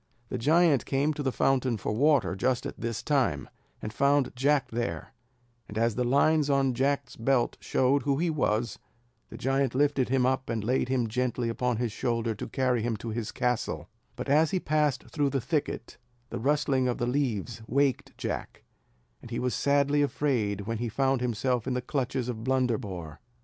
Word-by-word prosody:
The 125 - -3
giant 155 +1 +3
came 145 +3 +1
to 150 - -5
the 135 -2 0
fountain 130 -2 +1
for 105 - -3
water 130 -6 +3
just 125 +5 0
at - - -6
this 115 -1 -3
time, 125 - +1 0.4
and 105 - -4
found 140 0 +2
Jack 140 +2 +2
there; 120 +1 -3 0.5
and 105 - -7
as 115 0 +2
the 125 - 0
lines 145 +4 +3
on 135 -2 +2
Jack's 140 +1 0
belt 120 +1 +1
showed 135 +2 +2
who 140 0 0
he 170 +2 +1
was, 120 -6 0 0.5
the - - -9
giant 135 -1 0
lifted 140 -2 +2
him 130 -1 +2
up 130 0 0
and 115 -3 -1
laid 125 +2 0
him 130 -2 +1
gently 120 +1 -1
upon 125 0 -1
his 120 -1 -1
shoulder 115 0 -1
to 105 - -6
carry 125 -1 +1
him 115 -1 -1
to 115 +3 -6
his 110 -1 -3
castle: 125 -1 -2 0.3
but - - -5
as 150 +3 +4
he 185 - 0
passed 150 -6 +1
through 145 -2 -1
the 135 0 0
thicket, 150 +4 -3 0.3
the - - -3
rustling 140 -1 +1
of 120 - -1
the 120 - -1
leaves 120 -4 -1
waked 135 +3 0
Jack; - - -5 0.6
and 120 - -11
he 120 - -3
was 125 -1 -1
sadly 140 +1 +2
afraid 120 -8 0
when 115 +2 -3
he 120 -1 -2
found 135 +2 +1
himself 125 0 0
in 130 - 0
the - - +1
clutches 130 -1 -2
of 115 -3 -4
Blunderbore. 115 - -1
130 Hz, 185 wpm, -28 LUFS, 115-140 Hz, 0.6 s, as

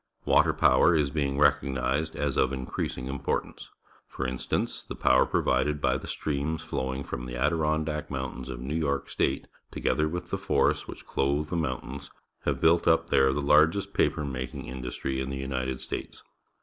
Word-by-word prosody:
Water - - +5
power 85 - +4
is 75 -3 +2
being 70 -2 -1
recognized 70 +1 +1
as 70 -2 -1
of 65 - +2
increasing 65 -1 -3
importance. 70 +1 -3 0.4
For 65 - -4
instance, 65 0 -2
the - - -7
power 65 - +4
provided 75 +4 +1
by 65 -2 +1
the - - -9
streams 75 +2 -2
flowing 65 -1 -3
from 60 -1 -5
the - - -6
Adirondack 75 +2 0
Moun 65 -2 -3
tains 65 - -8
of - - -5
New 65 +4 -4
York 70 -4 -1
State, - - 0 0.2
together 75 - 0
with 85 +1 -5
the - - -1
forests - - +1
which - - -9
clothe 70 +3 0
the - - 0
mountains, 70 -2 -3 0.4
have - - 0
built 85 +1 +4
up 80 -1 +3
there 65 0 +5
the 70 +2 -2
largest 80 +7 +4
paper 75 - +1
making 65 -2 -5
indus 60 0 -6
try 65 - -3
in 65 0 -2
the 70 - -3
United 65 -1 -3
States. - - -6
70 Hz, 175 wpm, -28 LUFS, 65-75 Hz, 0.4 s, Water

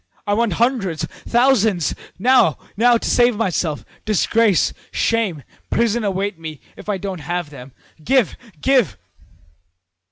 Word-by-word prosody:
I 205 - 0
want 225 -2 +1
hundreds 225 - 0 0.2
thousands 225 - +3 0.2
now, 235 - +4 0.2
now, 235 +3 +4
to - - -5
save 240 -1 +3
myself! 180 -7 -1 0.2
Disgrace, 215 -1 +2 0.2
shame, 210 - 0 0.3
prison 235 0 +1
await 195 -2 -2
me 155 -3 -7 0.2
if - - -10
I 205 - 0
don't 190 -3 -5
have 175 +1 -3
them. 130 -1 -11 0.3
Give, 260 - +2 0.2
give!' 225 - +2
205 Hz, 125 wpm, -20 LUFS, 170-235 Hz, 0.3 s, now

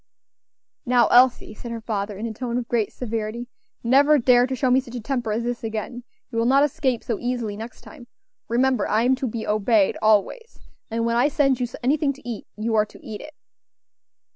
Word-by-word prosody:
"Now, 245 -1 +3
Elsie," 245 -3 +4
said 235 +3 -9
her 230 0 -4
father, 210 -2 -4
in 215 - -4
a 225 - -4
tone 240 +1 -3
of 245 -2 -3
great 230 -4 0
severity, 230 0 -4 0.4
"never 280 +5 +5
dare 245 -1 +4
to 260 - -3
show 255 0 +1
me 255 - +5
such 250 -2 -9
a - - -3
temper 235 -1 -2
as 225 +2 -1
this 240 0 -3
again; 225 +2 -5 0.3
you 230 - -1
will 230 - +2
not 275 +2 +5
escape 260 -4 0
so 230 - -3
easily 240 -4 -3
next 225 +3 -9
time; 260 -7 -13 0.4
remember 250 -1 +1
I 220 +2 +2
am 255 +2 +3
to 265 -1 -2
be 225 -1 -4
obeyed 210 -1 +2
always; 220 - +1 0.3
and 230 0 -1
when 235 0 +1
I 250 +4 +4
send 275 -3 +1
you 245 - -1 0.2
anything 280 +2 +1
to 275 -2 -15
eat, 235 -3 -6
you 225 +2 -2
are 215 -1 +3
to - - -16
eat 215 -2 -7
it." 305 0 -12
240 Hz, 210 wpm, -23 LUFS, 220-260 Hz, 0.4 s, never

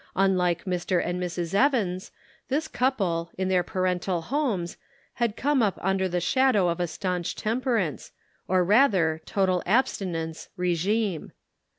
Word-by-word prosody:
Unlike 180 -3 +2
Mr. 180 0 0
and 175 +1 -2
Mrs. 175 -1 -3
Evans, 200 -6 +1 0.4
this 300 +4 -1
couple, 195 - 0
in 190 0 -1
their 185 -1 +3
parental 180 0 -1
homes, 220 - -1 0.5
had 230 -3 +1
come 285 -1 +2
up 205 -4 +1
under 190 0 0
the 180 0 0
shadow 210 -1 +3
of 170 +1 -2
a 175 - 0
stanch 180 +2 -3
temperance, 225 - -1 0.4
or 185 0 +3
rather 185 - +3
total 185 -2 +1
abstinence, 175 -8 -1
regime. 180 +1 0
185 Hz, 130 wpm, -26 LUFS, 175-220 Hz, 0.5 s, their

